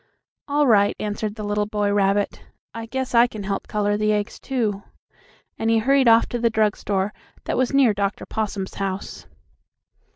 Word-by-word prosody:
"All 290 Hz, +1 st, +2 dB
right," 205 Hz, -5 st, +4 dB
answered 210 Hz, 0 st, -3 dB
the 215 Hz, -, -6 dB
little 205 Hz, 0 st, -1 dB
boy 205 Hz, -1 st, 0 dB
rabbit. 200 Hz, 0 st, +1 dB, 0.3 s
"I 230 Hz, 0 st, -6 dB
guess 260 Hz, +2 st, -4 dB
I 235 Hz, +1 st, +6 dB
can 215 Hz, -3 st, -8 dB
help 195 Hz, 0 st, -3 dB
color 205 Hz, -1 st, 0 dB
the 215 Hz, 0 st, +1 dB
eggs, 210 Hz, 0 st, -3 dB
too," 220 Hz, -7 st, -2 dB, 0.8 s
and 225 Hz, -, 0 dB
he 225 Hz, -, +4 dB
hurried 265 Hz, +3 st, +3 dB
off 230 Hz, 0 st, +6 dB
to 240 Hz, -, -3 dB
the 230 Hz, 0 st, +2 dB
drug 215 Hz, -1 st, +1 dB
store, 200 Hz, 0 st, -2 dB, 0.3 s
that -, -, -1 dB
was 255 Hz, -1 st, +1 dB
near 270 Hz, -5 st, +4 dB
Dr. 200 Hz, 0 st, -2 dB
Possum's 205 Hz, -3 st, -3 dB
house. 195 Hz, 0 st, -4 dB
210 Hz, 175 wpm, -22 LUFS, 205-230 Hz, 0.8 s, I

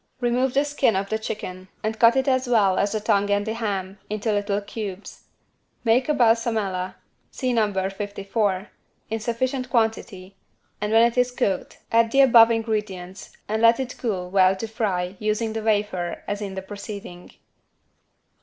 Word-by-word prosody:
Remove 245 Hz, +1 st, 0 dB
the 280 Hz, +1 st, +3 dB
skin 285 Hz, -6 st, +1 dB
of 195 Hz, +1 st, -2 dB
the 220 Hz, -, -1 dB
chicken 185 Hz, -4 st, -6 dB, 0.2 s
and 220 Hz, +1 st, -2 dB
cut 230 Hz, +1 st, +6 dB
it 265 Hz, +1 st, +1 dB
as 260 Hz, -1 st, +2 dB
well 205 Hz, -6 st, +3 dB
as 200 Hz, -, +1 dB
the 215 Hz, -, 0 dB
tongue 205 Hz, -1 st, +1 dB
and 205 Hz, 0 st, +1 dB
the 220 Hz, -, -2 dB
ham, 200 Hz, -4 st, -3 dB
into 215 Hz, +1 st, -1 dB
little 205 Hz, 0 st, 0 dB
cubes. 205 Hz, -1 st, -7 dB, 0.6 s
Make 245 Hz, +4 st, +2 dB
a 300 Hz, -, +3 dB
=Balsamella= 225 Hz, -6 st, +1 dB, 0.3 s
(see 255 Hz, -2 st, -2 dB
No. 215 Hz, -3 st, +2 dB, 0.2 s
54) 200 Hz, 0 st, -2 dB, 0.4 s
in 225 Hz, -, -1 dB
sufficient 255 Hz, +3 st, -2 dB
quantity 220 Hz, -5 st, -1 dB, 0.5 s
and 210 Hz, 0 st, -1 dB
when 225 Hz, +1 st, +6 dB
it 235 Hz, +1 st, +2 dB
is 250 Hz, 0 st, +3 dB
cooked 245 Hz, -7 st, -2 dB
add 230 Hz, 0 st, +4 dB
the 275 Hz, +4 st, +4 dB
above 235 Hz, -4 st, +7 dB
ingredients 210 Hz, -5 st, -3 dB
and 220 Hz, +1 st, -1 dB
let 230 Hz, +2 st, +5 dB
it 255 Hz, -1 st, -4 dB
cool 185 Hz, -7 st, -3 dB
well 190 Hz, -1 st, +4 dB
to 225 Hz, +4 st, -5 dB
fry 195 Hz, -5 st, -2 dB
using 215 Hz, +1 st, -1 dB
the 220 Hz, -, -3 dB
wafer 205 Hz, -5 st, -1 dB
as 205 Hz, +1 st, -3 dB
in 195 Hz, -2 st, -5 dB
the 190 Hz, -, -5 dB
preceding. 200 Hz, -3 st, -9 dB
215 Hz, 170 wpm, -24 LUFS, 195-230 Hz, 0.6 s, above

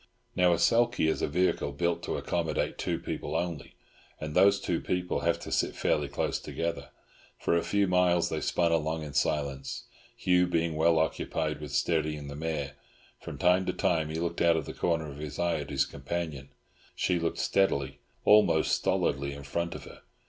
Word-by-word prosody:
Now, 90 Hz, -1 st, +4 dB
a 85 Hz, -, +3 dB
sulky 115 Hz, -7 st, +3 dB
is 80 Hz, -, 0 dB
a -, -, +1 dB
vehicle 80 Hz, -3 st, 0 dB
built 85 Hz, +3 st, 0 dB
to -, -, -2 dB
accommodate 80 Hz, -3 st, -2 dB
two -, -, -1 dB
people -, -, -5 dB
only, 85 Hz, -4 st, -3 dB, 0.4 s
and 75 Hz, -1 st, -5 dB
those 100 Hz, +3 st, +5 dB
two 85 Hz, -4 st, -1 dB
people 90 Hz, 0 st, -1 dB
have 85 Hz, 0 st, +1 dB
to -, -, -7 dB
sit -, -, 0 dB
fairly -, -, +1 dB
close -, -, -2 dB
together. 85 Hz, 0 st, -4 dB, 0.5 s
For -, -, +1 dB
a 85 Hz, -, +3 dB
few 100 Hz, -1 st, +1 dB
miles 90 Hz, -1 st, +3 dB
they -, -, -2 dB
spun 85 Hz, -1 st, +1 dB
along 80 Hz, 0 st, 0 dB
in 75 Hz, -2 st, -7 dB
silence, 70 Hz, -1 st, -1 dB, 0.3 s
Hugh 90 Hz, -1 st, +3 dB
being 85 Hz, -2 st, 0 dB
well 80 Hz, +1 st, +3 dB
occupied 80 Hz, -1 st, -1 dB
with 75 Hz, -2 st, -7 dB
steadying 75 Hz, -3 st, 0 dB
the 70 Hz, -, -7 dB
mare. 75 Hz, -3 st, -3 dB, 0.4 s
From -, -, -8 dB
time 90 Hz, +2 st, +3 dB
to -, -, 0 dB
time 80 Hz, -3 st, +1 dB
he 80 Hz, -, -5 dB
looked 85 Hz, 0 st, -2 dB
out 85 Hz, -1 st, +4 dB
of 80 Hz, -, -3 dB
the -, -, -6 dB
corner 80 Hz, -2 st, 0 dB
of 70 Hz, -, -10 dB
his 75 Hz, -1 st, -6 dB
eye 85 Hz, -2 st, +1 dB
at 75 Hz, -, -6 dB
his 70 Hz, -1 st, +1 dB
companion; 70 Hz, -1 st, -5 dB, 0.5 s
she 90 Hz, -2 st, +1 dB
looked 85 Hz, 0 st, -1 dB
steadily, 70 Hz, -8 st, +1 dB, 0.3 s
almost 105 Hz, 0 st, +5 dB
stolidly, 70 Hz, 0 st, 0 dB
in 70 Hz, 0 st, -9 dB
front 85 Hz, +4 st, -3 dB
of -, -, -8 dB
her. -, -, -13 dB
80 Hz, 190 wpm, -29 LUFS, 75-85 Hz, 0.5 s, those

